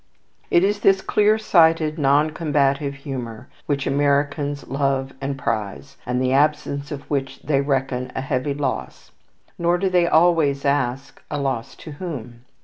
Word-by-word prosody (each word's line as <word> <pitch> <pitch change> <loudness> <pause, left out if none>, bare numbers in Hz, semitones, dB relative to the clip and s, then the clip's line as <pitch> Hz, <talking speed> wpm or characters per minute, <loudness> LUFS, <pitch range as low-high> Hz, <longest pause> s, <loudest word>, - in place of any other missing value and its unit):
It 175 - +4
is 205 +1 +1
this 195 -1 +4
clear 210 +2 +2
sighted, 165 -6 +3
non 145 +2 +3
combative 140 -3 0
humour 130 -4 -7 0.2
which 140 -2 -1
Americans 145 0 0
love 135 -1 -1
and 135 0 -3
prize, 115 0 -4
and 125 0 0
the 130 0 +1
absence 145 0 +1
of 140 -2 -7
which 135 -2 -3
they 140 -1 +1
reckon 135 -2 -1
a - - -2
heavy 135 +1 -2
loss. 145 -1 -4 0.5
Nor 170 +1 +2
do 190 +1 0
they 175 -1 +3
always 160 -5 +3
ask, 135 -1 -1
"a 145 - -3
loss 130 -4 -3
to 155 - -10
whom?" 125 -8 -7
140 Hz, 150 wpm, -22 LUFS, 135-155 Hz, 0.5 s, It